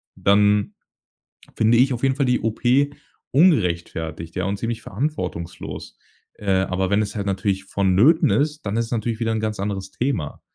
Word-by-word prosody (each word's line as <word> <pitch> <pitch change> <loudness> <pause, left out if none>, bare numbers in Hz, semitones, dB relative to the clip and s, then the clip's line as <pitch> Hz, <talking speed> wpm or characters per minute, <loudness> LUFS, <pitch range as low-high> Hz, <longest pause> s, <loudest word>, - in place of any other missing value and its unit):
dann 105 +1 +3 0.8
finde 110 +2 +3
ich 130 +2 +4
auf 120 - -6
jeden 135 -1 +2
Fall 140 -1 +1
die 125 -1 +1
OP 115 0 -3 0.7
ungerechtfertigt, 85 - +1
ja 95 - -1
und 100 +1 -1
ziemlich 115 0 -3
verantwortungslos. 100 - -5 0.4
Äh, 100 -2 -3
aber 95 0 -1
wenn 100 +2 +2
es 105 -1 -3
halt 100 -2 -3
natürlich 95 0 -1
vonnöten 100 - +3
ist, 150 +1 0
dann 100 +1 -2
ist 115 - +1
es 115 - -12
natürlich 115 -1 -2
wieder 115 -1 0
'n 110 - -1
ganz 110 -1 -3
anderes 95 -1 -3
Thema. 120 - -3
105 Hz, 170 wpm, -22 LUFS, 95-120 Hz, 0.8 s, ich